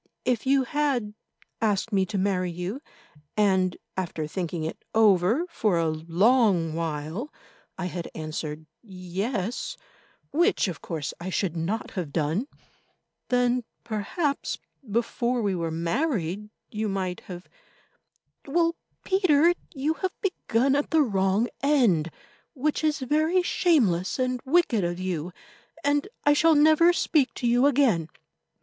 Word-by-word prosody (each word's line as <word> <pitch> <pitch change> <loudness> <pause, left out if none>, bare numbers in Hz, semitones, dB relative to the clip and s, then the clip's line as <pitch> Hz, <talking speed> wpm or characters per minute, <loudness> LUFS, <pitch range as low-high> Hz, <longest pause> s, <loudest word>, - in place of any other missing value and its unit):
If 250 0 0
you 270 0 +4
had 260 -6 -1 0.5
asked 215 0 0
me 190 -1 +2
to 205 - -3
marry 185 -2 0
you, 180 +9 -5 0.6
and, 190 -3 +2 0.2
after 170 -4 -3
thinking 170 0 -3
it 160 - -5
over 215 - +4
for 210 - +1
a 165 -1 +1
long 175 +2 +2
while, 165 - -3 0.5
I 185 - -3
had 175 -1 -5
answered 155 0 -5 0.2
Yes, 195 +2 -4 0.5
which 345 - +2
of 180 - -5
course 155 -5 -4
I 175 +2 -5
should 185 -2 -1
not 175 +7 -2
have 175 -7 -4
done, 160 - 0 0.8
then, 245 0 +2 0.2
perhaps, 275 - -2 0.3
before 235 +2 0
we 200 -2 +1
were 170 -2 -2
married 180 - -1 0.2
you 215 0 -2
might 185 -2 -2
have—Well, 330 - -5 0.3
Peter, 350 -4 +4 0.2
you 295 0 -1
have 375 -1 -3
begun 275 - +1
at 285 - 0
the 320 -2 +4
wrong 195 -1 +1
end, 235 - +3 0.5
which 295 +3 -1
is 305 -2 +1
very 310 +7 +2
shameless 225 - +2
and 255 -1 -1
wicked 265 - +3
of 175 +1 -2
you, 180 -2 -3 0.5
and 290 +2 +1 0.2
I 290 - +5
shall 320 +2 +4
never 315 +3 +6
speak 305 -5 +1
to 245 - -4
you 245 +3 +4
again." 240 - +2
215 Hz, 130 wpm, -26 LUFS, 180-280 Hz, 0.8 s, never